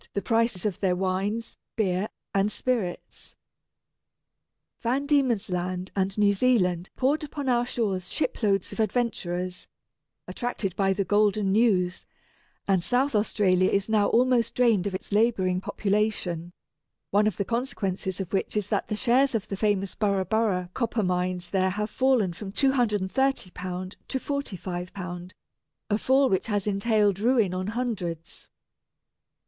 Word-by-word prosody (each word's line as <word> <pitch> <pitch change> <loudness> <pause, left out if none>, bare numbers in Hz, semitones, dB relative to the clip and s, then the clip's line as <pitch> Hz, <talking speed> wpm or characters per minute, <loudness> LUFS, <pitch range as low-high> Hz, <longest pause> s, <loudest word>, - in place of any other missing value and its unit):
the - - 0
prices 230 -5 +1
of 200 -5 -1
their 185 -2 +1
wines, 195 +5 -2 0.2
beer, 195 -2 0 0.3
and 200 +1 +2
spirits. 225 -9 -3 1.5
Van 260 +4 0
Diemen's 260 -8 +2
Land 180 +1 -3
and 195 0 0
New 205 -1 +4
Zealand 190 -6 +2
poured 280 +4 +1
upon 285 -1 -5
our 240 -1 +2
shores 195 -7 -2
shiploads 200 -10 0
of - - -9
adventurers, 185 -5 -1 0.6
attracted 220 -7 -3
by 195 -1 +2
the 200 +1 0
golden 205 -1 +2
news; 195 -5 +2 0.6
and 190 -3 +2
South 250 +9 +1
Australia 195 -3 +2
is 200 0 0
now 215 -2 +3
almost 245 0 +2
drained 230 -7 +3
of 190 - -3
its 185 - -7
labouring 200 -4 +2
population, 195 -5 -1 0.6
one 210 +2 +4
of 210 - -1
the 200 - -1
consequences 200 -6 -2
of 190 -1 -5
which 195 +2 -1
is 210 - 0
that 205 - 0
the 210 - -2
shares 255 +3 +2
in 215 - 0
the 195 - -2
famous 195 -1 0
Burra 200 -3 0
Burra 185 -3 0
copper 230 -3 -1
mines 180 -1 -1
there 190 -1 +2
have 210 +3 -3
fallen 255 -9 +2
from 195 +3 -7
£230 205 -6 0
to 265 - -1
£45, 180 -9 -5 0.6
a 205 - +3
fall 265 +3 +4
which 190 -2 0
has 205 -3 -1
entailed 205 -1 +2
ruin 225 -4 +2
on 185 +1 -3
hundreds. 210 -9 -4
205 Hz, 140 wpm, -26 LUFS, 185-230 Hz, 1.5 s, New